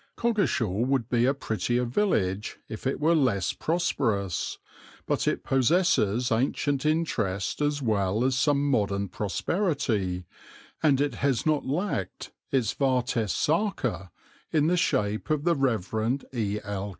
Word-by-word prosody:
Coggeshall 130 - +1
would 130 -4 0
be 120 -1 +2
a 135 - +3
prettier 120 -1 -1
village 110 - 0
if 110 +4 -5
it 135 - -1
were 160 +3 +3
less 120 - +1
prosperous, 110 - -1 0.5
but - - -1
it - - 0
possesses 130 - +2
ancient 135 +4 0
interest 115 - -1
as 145 -1 0
well 105 -1 +1
as 130 0 +2
some 145 +2 +2
modern 100 -6 0
prosperity, 105 - -1 0.6
and 145 -4 +3
it 145 -2 +1
has 135 0 0
not 155 -3 +1
lacked 145 - -3 0.2
its 125 -6 +1
vates 125 -5 0
sacer 135 - 0 0.4
in 150 -2 +3
the 175 +3 +3
shape 105 -9 0
of 155 -2 +1
the 170 0 +3
Rev. 115 - 0 0.2
E. 105 -4 -1
L. 100 0 -4
125 Hz, 135 wpm, -27 LUFS, 105-145 Hz, 0.6 s, a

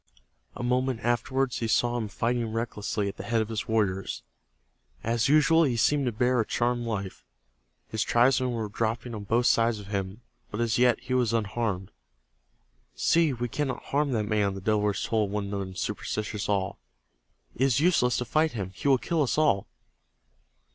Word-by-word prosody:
A - - -5
moment 125 -1 0
afterward 120 +2 0
he 115 - -2
saw 120 +2 +2
him 115 -3 -2
fighting 115 +2 -1
recklessly 110 -2 -2
at 100 - -5
the - - -6
head 115 -1 0
of 110 0 -1
his 110 -1 -3
warriors. 100 -4 -1 0.8
As 115 +1 +1
usual 155 +2 +5
be 125 -6 +1
seemed 140 +3 +2
to - - +1
bear 125 +3 +1
a - - +1
charmed 120 0 0
life. 100 -4 -4 0.7
His 110 - -2
tribesmen 125 +3 +3
were 115 -3 -2
dropping 115 +3 -2
on 105 -2 -6
both 115 +4 +1
sides 115 -1 +3
of 100 -1 -10
him, 100 +2 -3 0.3
but 105 - -5
as 115 0 +1
yet 125 -2 +4
he 130 - -4
was 125 -3 +2
unharmed. 105 -3 -1 1.0
"See, 165 -2 +3
we 120 -1 -3
cannot 130 +1 -3
harm 145 +1 0
that 110 -2 +1
man!" 105 -2 0
the 95 - -7
Delawares 105 0 +1
told 110 -3 0
one 105 0 -2
another 100 -1 -3
in 95 0 -10
superstitious 105 +2 -3
awe. 95 -2 0 0.8
"It - - -9
is 135 -1 +3
useless 145 -7 +3
to 125 - -2
fight 155 +6 +1
him. 100 -5 -4
He 120 - -4
will 135 -1 +5
kill 165 +5 -1
us 140 - 0
all!" 150 -11 +2
115 Hz, 180 wpm, -27 LUFS, 105-125 Hz, 1.0 s, usual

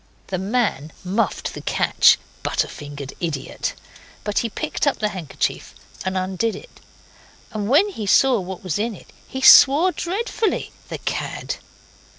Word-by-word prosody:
The 185 - -2
man 195 - -1
muffed 195 +5 -1
the - - -7
catch - - +4 0.2
butter - - 0
fingered 145 -2 -8
idiot! 145 -6 -3 0.5
but 210 - 0
he 230 - -1
picked 300 +5 -2
up 285 - +2
the 210 - 0
handkerchief 175 -8 -3 0.3
and 190 0 -2
undid 190 +4 -1
it, - - -13 0.7
and 210 -2 -3
when 310 +10 +5
he 220 - -5
saw 260 +3 +5
what 185 0 -7
was 185 -1 -2
in 225 0 -1
it - - -16
he 265 - -5
swore 290 +7 +8
dreadfully. 405 +4 -2 0.2
The - - -5
cad! - - -3
210 Hz, 150 wpm, -22 LUFS, 185-270 Hz, 0.7 s, swore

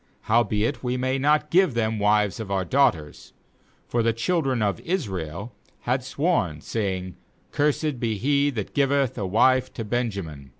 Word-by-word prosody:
18Howbeit 115 +2 +1
we 125 0 -1
may 130 +1 0
not 150 +2 +2
give 180 -7 +4
them 110 -1 0
wives 105 -1 +2
of 110 -3 -6
our 95 -2 -1
daughters.' 85 - 0 0.5
For 120 - 0
the 115 0 +2
children 130 -1 0
of 100 -4 0
Israel 100 - -4 0.3
had 125 +1 -1
sworn, 135 - 0
saying: 95 -4 -3 0.3
'Cursed 150 -2 0
be 115 -3 -1
he 140 +5 +2
that 110 -8 -5
giveth 140 -2 +1
a 100 - -3
wife 130 +6 +3
to 115 - -4
Benjamin.' 100 - -3
115 Hz, 155 wpm, -24 LUFS, 100-135 Hz, 0.5 s, give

